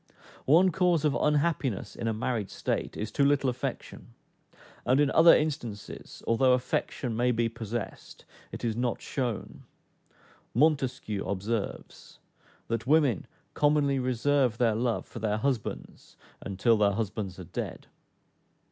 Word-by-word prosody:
One 175 Hz, +7 st, +6 dB
cause 175 Hz, -3 st, +2 dB
of 150 Hz, -, +3 dB
unhappiness 150 Hz, -, 0 dB
in 115 Hz, -, -4 dB
a -, -, +2 dB
married 110 Hz, -2 st, -2 dB
state, -, -, -3 dB
is 105 Hz, -, -4 dB
too 140 Hz, -, +1 dB
little 140 Hz, -2 st, +3 dB
affection; 125 Hz, -, -6 dB, 0.7 s
and 130 Hz, +2 st, +3 dB
in 145 Hz, -2 st, +3 dB
other 165 Hz, +1 st, +7 dB
instances, 120 Hz, -10 st, -4 dB
although 125 Hz, +3 st, +4 dB
affection 125 Hz, -1 st, -1 dB
may 120 Hz, +2 st, +2 dB
be 115 Hz, 0 st, +1 dB
possessed, 115 Hz, 0 st, -6 dB, 0.3 s
it -, -, -5 dB
is 115 Hz, -2 st, 0 dB
not 120 Hz, 0 st, -1 dB
shown. 125 Hz, -6 st, -4 dB, 0.9 s
Montesquieu 130 Hz, -7 st, +1 dB
observes, 100 Hz, +2 st, -4 dB, 0.5 s
"that 115 Hz, +1 st, -3 dB
women 145 Hz, -, +3 dB, 0.3 s
commonly 145 Hz, -2 st, +2 dB
reserve 130 Hz, -1 st, +1 dB
their 120 Hz, -2 st, +3 dB
love 115 Hz, +1 st, -1 dB
for -, -, -9 dB
their 105 Hz, -1 st, 0 dB
husbands 125 Hz, -2 st, -4 dB, 0.2 s
until 110 Hz, +4 st, +2 dB
their 100 Hz, -1 st, +3 dB
husbands 100 Hz, -3 st, -3 dB
are 95 Hz, -, -7 dB
dead." 85 Hz, +1 st, -6 dB
120 Hz, 130 wpm, -28 LUFS, 110-140 Hz, 0.9 s, other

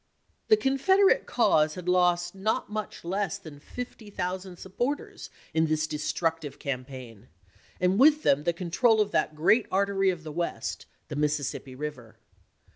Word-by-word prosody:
The 435 Hz, -, +6 dB
Confederate 380 Hz, +6 st, +3 dB
cause 155 Hz, -10 st, +3 dB
had 180 Hz, -1 st, -8 dB
lost 175 Hz, -1 st, +2 dB
not 205 Hz, +2 st, -1 dB
much 215 Hz, -4 st, -5 dB
less 195 Hz, +1 st, -1 dB
than 155 Hz, -7 st, -12 dB
fifty 235 Hz, +4 st, -8 dB
thousand 185 Hz, -1 st, -4 dB
supporters 245 Hz, +11 st, -4 dB, 0.2 s
in 160 Hz, 0 st, +2 dB
this 155 Hz, 0 st, +1 dB
destructive 155 Hz, 0 st, -2 dB
cam 130 Hz, -2 st, -4 dB
paign, 125 Hz, -4 st, -11 dB, 0.5 s
and 180 Hz, +3 st, +2 dB
with 300 Hz, +3 st, +6 dB
them 145 Hz, +2 st, +3 dB
the 170 Hz, -, +2 dB
control 190 Hz, +7 st, +2 dB
of 210 Hz, -1 st, +1 dB
that 155 Hz, -, 0 dB
great 195 Hz, +9 st, +3 dB
artery 195 Hz, 0 st, +2 dB
of 175 Hz, -3 st, -3 dB
the 155 Hz, -, -7 dB
West, 170 Hz, +3 st, -4 dB, 0.2 s
the 150 Hz, -, -5 dB
Mississippi 145 Hz, -3 st, -2 dB
River. 130 Hz, -6 st, -7 dB
175 Hz, 150 wpm, -27 LUFS, 150-205 Hz, 0.5 s, The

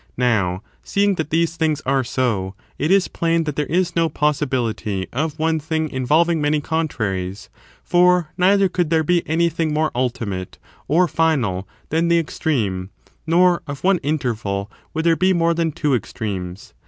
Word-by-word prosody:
Now, 105 Hz, -7 st, +1 dB, 0.2 s
seeing 200 Hz, 0 st, +1 dB
that 160 Hz, -4 st, -3 dB
these 165 Hz, +1 st, +1 dB
things 155 Hz, -2 st, 0 dB
are 135 Hz, 0 st, +2 dB
so, 110 Hz, -7 st, -1 dB, 0.2 s
it 150 Hz, -, 0 dB
is 195 Hz, 0 st, +4 dB
plain 165 Hz, 0 st, 0 dB
that 150 Hz, -3 st, -4 dB
there 150 Hz, -2 st, -1 dB
is 175 Hz, +2 st, 0 dB
no 165 Hz, -1 st, +2 dB
possibility 130 Hz, -10 st, -1 dB
of 155 Hz, +4 st, -2 dB
one 160 Hz, 0 st, +1 dB
thing 160 Hz, 0 st, -2 dB
involving 155 Hz, +6 st, +2 dB
many 150 Hz, +1 st, +2 dB
contraries; 105 Hz, -, -3 dB, 0.3 s
for 180 Hz, -2 st, +3 dB
neither 195 Hz, +2 st, +4 dB
cotild 175 Hz, -3 st, -1 dB
there 160 Hz, -1 st, +2 dB
be 175 Hz, +2 st, +2 dB
anything 165 Hz, -1 st, +1 dB
more 155 Hz, 0 st, +1 dB
ultimate, 115 Hz, -7 st, -3 dB, 0.3 s
or 175 Hz, +4 st, +3 dB
final, 140 Hz, -, 0 dB, 0.2 s
than 165 Hz, +2 st, +1 dB
the 170 Hz, 0 st, +4 dB
extreme, 110 Hz, -, -1 dB, 0.4 s
nor 175 Hz, +1 st, +4 dB
of 140 Hz, -1 st, -7 dB
one 190 Hz, -1 st, +3 dB
interval 115 Hz, -9 st, -2 dB, 0.2 s
would 160 Hz, +1 st, -1 dB
there 165 Hz, -1 st, +4 dB
be 185 Hz, +3 st, +3 dB
more 170 Hz, -1 st, +2 dB
than 165 Hz, -1 st, 0 dB
two 145 Hz, -1 st, 0 dB
extremes. 100 Hz, -, -4 dB
155 Hz, 160 wpm, -21 LUFS, 120-170 Hz, 0.4 s, is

